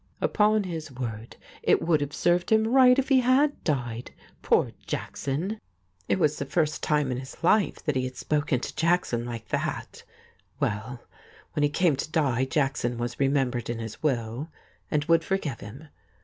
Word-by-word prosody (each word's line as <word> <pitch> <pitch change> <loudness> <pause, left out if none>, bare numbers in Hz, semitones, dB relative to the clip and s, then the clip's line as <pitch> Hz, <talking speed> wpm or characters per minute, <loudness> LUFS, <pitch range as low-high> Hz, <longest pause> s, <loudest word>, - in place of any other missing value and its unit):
Upon 215 0 +3
his 160 -5 -5
word, 115 -3 -6 0.3
it - - +3
would 160 -3 +2
have 145 0 -2
served 175 +3 +1
him 220 0 +4
right 250 +1 +6
if 270 0 0
he 270 -2 +6
had 265 +4 +2
died. 120 -6 -2 0.3
Poor - - +2 0.2
Jackson! 170 +11 -3 0.5
It 100 - +3
was 150 +6 +1
the 140 - -2
first 155 +2 0
time 150 -3 +1
in 125 - -2
his 130 +4 -11
life 205 +4 +3
he 130 -5 0
had 130 0 -6
spoken 145 -4 0
to - - -5
Jackson 165 -9 +1
like 115 -2 -7
that. - - -3 0.6
Well, 115 +4 -2 0.5
when 150 - -1
he 145 - +4
came 165 0 +2
to 145 - -3
die 130 -6 +1
Jackson 135 -4 0
was 120 0 -4
remembered 135 -4 +1
in 120 - -2
his 115 -1 -7
will, 125 0 -1 0.4
and 150 -1 0
would 165 0 +4
forgive 155 - -2
him. 135 +10 -10
145 Hz, 170 wpm, -27 LUFS, 125-175 Hz, 0.6 s, right